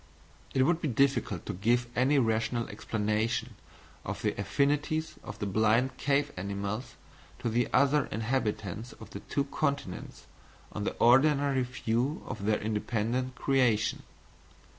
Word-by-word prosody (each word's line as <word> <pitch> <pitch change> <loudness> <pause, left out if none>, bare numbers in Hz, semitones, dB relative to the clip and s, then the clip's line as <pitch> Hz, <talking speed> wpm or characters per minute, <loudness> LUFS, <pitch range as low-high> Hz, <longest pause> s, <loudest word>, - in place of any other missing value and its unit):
It 130 - +5
would 170 +4 +2
be 155 - 0
difficult 125 - +1
to - - -3
give 120 +6 +2
any 130 +4 +3
rational 115 -1 +1
explanation 110 +2 -1 0.5
of - - -5
the - - +1
affinities 145 +9 0
of 105 - -8
the 105 - -3
blind 110 +6 +2
cave 145 0 +1
animals 100 +5 -4 0.4
to 120 - -2
the 120 +2 +1
other 140 0 +3
inhabitants 110 -2 -2
of 110 -2 -13
the 100 - -6
two 140 - -1
continents 140 -8 -3 0.5
on 105 - -4
the - - -2
ordinary 135 +2 +4
view 125 +3 -1
of 100 - -5
their 105 0 +3
independent 115 +4 -1
creation. 125 -6 +2
120 Hz, 135 wpm, -30 LUFS, 105-140 Hz, 0.5 s, It